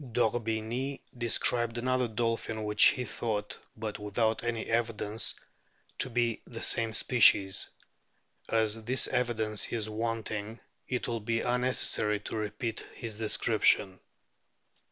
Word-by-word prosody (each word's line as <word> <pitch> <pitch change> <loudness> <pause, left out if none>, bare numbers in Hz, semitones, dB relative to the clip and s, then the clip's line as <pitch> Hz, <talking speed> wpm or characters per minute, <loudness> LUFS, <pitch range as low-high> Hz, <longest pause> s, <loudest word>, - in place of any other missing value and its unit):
D'Orbigny 120 +3 -1 0.2
described 120 0 +2
another 130 +1 +1
dolphin 115 -1 -2
which 105 0 +4
he 125 - +3
thought, 105 -4 -3 0.2
but 110 -1 -5
without 110 +2 0
any 120 -1 -2
evidence, 115 -2 -1 0.6
to - - +5
be 120 -2 0
the 115 -1 -4
same 115 -1 +2
species; 105 -5 +4 0.8
as 110 0 0
this 130 +2 +3
evidence 110 -4 -1
is 110 -2 -2
wanting 110 -1 -3 0.3
it 125 -1 -2
will 115 -1 -2
be 115 +2 -1
unnecessary 125 -4 +1
to - - -6
repeat 110 +1 -3 0.2
his 110 -2 -6
description. 95 -3 +2
115 Hz, 115 wpm, -30 LUFS, 110-120 Hz, 0.8 s, to